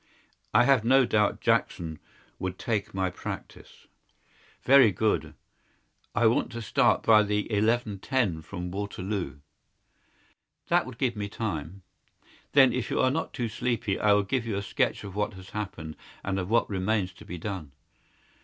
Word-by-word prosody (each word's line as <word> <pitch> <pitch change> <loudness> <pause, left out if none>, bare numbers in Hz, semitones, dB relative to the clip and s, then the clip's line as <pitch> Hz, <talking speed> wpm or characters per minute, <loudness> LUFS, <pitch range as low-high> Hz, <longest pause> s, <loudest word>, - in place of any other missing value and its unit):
"I - - +5
have 130 -3 +4
no 130 +2 +5
doubt 105 -2 +1
Jackson 80 -3 0 0.4
would 95 0 -3
take 110 -4 -2
my 95 -1 0
practice." - - -9 0.8
"Very 130 -4 +7
good. 105 +4 0 0.8
I 120 - +3
want 115 +3 +2
to 115 - -5
start - - +2
by 110 -1 +6
the 105 0 -1
11.10 105 -3 0
from 90 +1 -6
Waterloo." 95 -6 -4 1.3
"That - - +3
would 130 -2 -9
give 125 -3 0
me 100 -1 -4
time." 95 -4 -4 0.7
"Then, 135 -4 +6
if 125 -2 -2
you - - -1
are 130 - +3
not 160 +4 -2
too 120 - -2
sleepy, 110 -1 -2
I 105 - +3
will 100 0 +3
give 120 +3 -2
you 110 - -1
a 100 - -3
sketch - - -1
of 100 -2 -7
what 105 0 -1
has 95 0 -12
happened, 90 -7 -5 0.3
and 95 -1 -1
of 90 0 -4
what 115 +1 +3
remains 95 -1 -1
to - - -14
be 90 - -7
done." 85 -5 -5
105 Hz, 160 wpm, -27 LUFS, 95-115 Hz, 1.3 s, Very